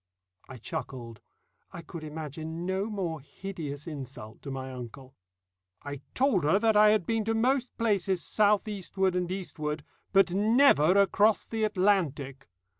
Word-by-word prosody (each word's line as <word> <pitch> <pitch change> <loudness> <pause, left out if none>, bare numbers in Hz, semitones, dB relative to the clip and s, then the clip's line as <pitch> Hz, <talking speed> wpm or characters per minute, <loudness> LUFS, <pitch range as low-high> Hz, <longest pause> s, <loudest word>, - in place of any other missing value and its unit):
I 130 - -8
chuckled. 115 -1 -7 0.5
I 170 - -8
could 160 0 -8
imagine 160 +2 -6
no 190 +2 -1
more 175 -7 -3
hideous 150 -2 -7
insult 130 -8 -8
to 140 - -8
my 130 -1 -5
uncle. 130 +2 -9 0.7
"I 145 -1 -6
told 255 - +2
her 155 +6 +4
that 220 0 +2
I 210 0 +7
had 210 -4 +2
been 225 +2 0
to 225 0 0
most 250 +2 +1
places 200 -5 0
south 210 0 +2
eastward 190 -2 -1
and 180 0 -1
eastward, 155 -5 -4 0.3
but 195 -2 +4
never 205 - +5
across 205 +2 +3
the 225 -1 -3
Atlantic. 165 -10 0
180 Hz, 145 wpm, -29 LUFS, 145-210 Hz, 0.7 s, I